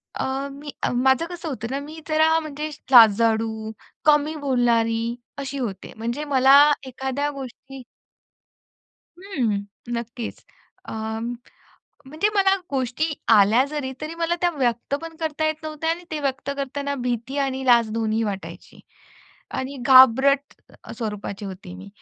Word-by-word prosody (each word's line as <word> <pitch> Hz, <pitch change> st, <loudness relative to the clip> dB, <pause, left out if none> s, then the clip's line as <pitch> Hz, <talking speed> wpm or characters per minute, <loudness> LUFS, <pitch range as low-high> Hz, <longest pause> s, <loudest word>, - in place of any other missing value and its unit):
अ, -, -, -2 dB, 0.3 s
मी 290 Hz, +1 st, -9 dB
अ, -, -, +2 dB
माझं 265 Hz, +5 st, +3 dB
कसं 345 Hz, -2 st, -7 dB
होतं 235 Hz, -4 st, -4 dB
ना, 275 Hz, -, -1 dB
मी 305 Hz, +3 st, -9 dB
जरा 315 Hz, +1 st, +4 dB
म्हणजे 305 Hz, 0 st, -5 dB, 0.2 s
लाजाळू, 220 Hz, -1 st, +5 dB, 0.3 s
कमी 300 Hz, +1 st, +4 dB
बोलणारी 235 Hz, -3 st, +1 dB, 0.2 s
अशी 280 Hz, 0 st, -5 dB
होते. 210 Hz, -8 st, -5 dB
म्हणजे 235 Hz, +6 st, -3 dB
मला 265 Hz, +2 st, +7 dB, 0.3 s
एखाद्या 265 Hz, +3 st, -2 dB
गोष्टी 270 Hz, -1 st, -9 dB, 1.4 s
हं. 250 Hz, -, -1 dB, 0.3 s
नक्कीच. 235 Hz, 0 st, -5 dB, 0.4 s
अ, -, -, -8 dB, 1.1 s
म्हणजे 310 Hz, +10 st, 0 dB
मला 390 Hz, -1 st, +4 dB, 0.2 s
गोष्टी 260 Hz, +1 st, -1 dB, 0.3 s
आल्या 215 Hz, +5 st, +5 dB
जरी 285 Hz, -3 st, -4 dB
तरी 310 Hz, +2 st, -5 dB
मला 335 Hz, 0 st, 0 dB
त्या 350 Hz, -1 st, +3 dB
व्यक्त 245 Hz, 0 st, 0 dB
पण 325 Hz, -1 st, -8 dB
करता 315 Hz, -1 st, -2 dB
येत 310 Hz, -, +1 dB
नव्हत्या 310 Hz, +1 st, -3 dB
आणि 340 Hz, +2 st, -3 dB
ते 310 Hz, -, -3 dB
व्यक्त 270 Hz, -1 st, -2 dB
करतांना 280 Hz, +1 st, -3 dB
भीती 245 Hz, +3 st, -3 dB
आणि 265 Hz, -1 st, -1 dB
लाज 235 Hz, -3 st, +5 dB
दोन्हीही 225 Hz, 0 st, 0 dB
वाटायची. 200 Hz, -2 st, -7 dB, 0.7 s
आणि 265 Hz, +2 st, -4 dB
घाबरट 265 Hz, +2 st, +6 dB, 0.3 s
अ, -, -, -9 dB
स्वरूपाची 210 Hz, -3 st, -5 dB
होती 185 Hz, -1 st, -8 dB
मी. 190 Hz, +2 st, -10 dB
265 Hz, 135 wpm, -23 LUFS, 230-295 Hz, 1.4 s, मला